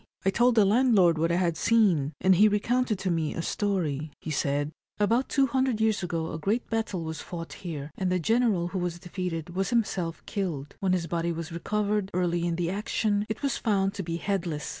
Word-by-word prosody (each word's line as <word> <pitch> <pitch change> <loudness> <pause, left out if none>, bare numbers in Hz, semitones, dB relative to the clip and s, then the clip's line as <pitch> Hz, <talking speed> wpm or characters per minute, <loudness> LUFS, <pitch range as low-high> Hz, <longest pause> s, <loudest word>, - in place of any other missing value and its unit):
I 195 - +4
told 240 +4 +3
the 215 -3 +6
landlord 200 -7 +4
what 165 +1 +2
I - - +2
had 175 -2 +1
seen, 175 -9 +3
and 190 - +5
he 205 +4 +6
recounted 220 +2 +1
to 185 -1 -1
me 160 -2 -1
a 165 - -3
story. 160 -9 -1
He 160 - -5
said: 145 0 0
" - - -42
About 230 +5 +2
200 260 -3 +2
years 220 -1 +2
ago 165 -2 -2
a 160 - -5
great 210 +9 0
battle 220 -6 -1
was 160 -1 -5
fought 165 -2 -7
here, 155 -5 -5
and 185 -1 -1
the 185 - +2
general 210 -2 +2
who 185 +1 -3
was 175 -1 -2
defeated 175 -2 -4
was 190 +2 -1
himself 195 -8 -1
killed. 165 -9 -4
When 190 -2 +1
his 180 -2 0
body 170 +1 -1
was 165 0 -5
recovered, 205 +3 -1
early 175 -1 +1
in 170 - 0
the 170 0 -1
action, 205 +1 0
it 220 - -4
was 275 - 0
found 195 -3 +1
to 205 - -4
be 165 -2 -3
headless. 170 -5 -2
185 Hz, 210 wpm, -27 LUFS, 165-210 Hz, -, the